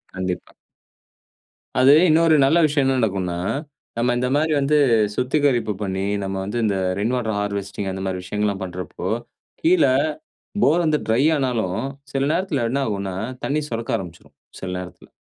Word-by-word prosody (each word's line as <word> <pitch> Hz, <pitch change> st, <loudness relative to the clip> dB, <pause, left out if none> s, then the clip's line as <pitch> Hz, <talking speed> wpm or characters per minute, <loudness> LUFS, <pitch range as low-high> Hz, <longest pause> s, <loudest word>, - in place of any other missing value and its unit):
கண்டிப்பா. 95 Hz, -1 st, -4 dB, 1.3 s
அது 130 Hz, +2 st, +7 dB, 0.2 s
இன்னொரு 160 Hz, 0 st, +5 dB
நல்ல 140 Hz, +5 st, +4 dB
விஷயம் 145 Hz, -2 st, +1 dB
என்ன 135 Hz, 0 st, +2 dB
நடக்குன்னா, 95 Hz, -6 st, -1 dB, 0.6 s
நம்ம 120 Hz, +1 st, +2 dB
இந்த 125 Hz, +1 st, 0 dB
மாதிரி 155 Hz, +2 st, +1 dB
வந்து 140 Hz, +2 st, +2 dB, 0.4 s
சுத்திகரிப்பு 125 Hz, -4 st, +1 dB
பண்ணி 95 Hz, -1 st, -2 dB, 0.2 s
நம்ம 95 Hz, 0 st, -3 dB
வந்து 105 Hz, +4 st, -4 dB
இந்த 100 Hz, -2 st, +1 dB, 0.2 s
ரெயின் 110 Hz, +5 st, 0 dB
வாட்டர் 110 Hz, -4 st, -1 dB
ஹார்வெஸ்டிங் 100 Hz, -1 st, -3 dB
அந்த 95 Hz, 0 st, -5 dB
மாரி 95 Hz, -1 st, -3 dB
விஷயங்கல்லாம் 105 Hz, +1 st, -2 dB
பண்றப்போ 90 Hz, 0 st, -5 dB, 0.5 s
கீழ 340 Hz, +2 st, +4 dB, 0.8 s
போர் 165 Hz, +5 st, +4 dB
வந்து 155 Hz, -1 st, +2 dB
ட்ரை 115 Hz, +4 st, +3 dB
ஆனாலும் 115 Hz, -8 st, -1 dB, 0.3 s
சில 135 Hz, 0 st, +1 dB
நேரத்தில 165 Hz, -8 st, 0 dB
என்ன 140 Hz, +2 st, 0 dB
ஆகுன்னா 100 Hz, -3 st, -3 dB, 0.3 s
தண்ணீர் 150 Hz, +1 st, -1 dB
சுரக்க 115 Hz, +1 st, -1 dB
ஆரம்பிச்சுடும். 85 Hz, -4 st, -10 dB, 0.2 s
சில 95 Hz, -, -5 dB
நேரத்துல 90 Hz, 0 st, -10 dB
115 Hz, 145 wpm, -22 LUFS, 95-140 Hz, 1.3 s, அது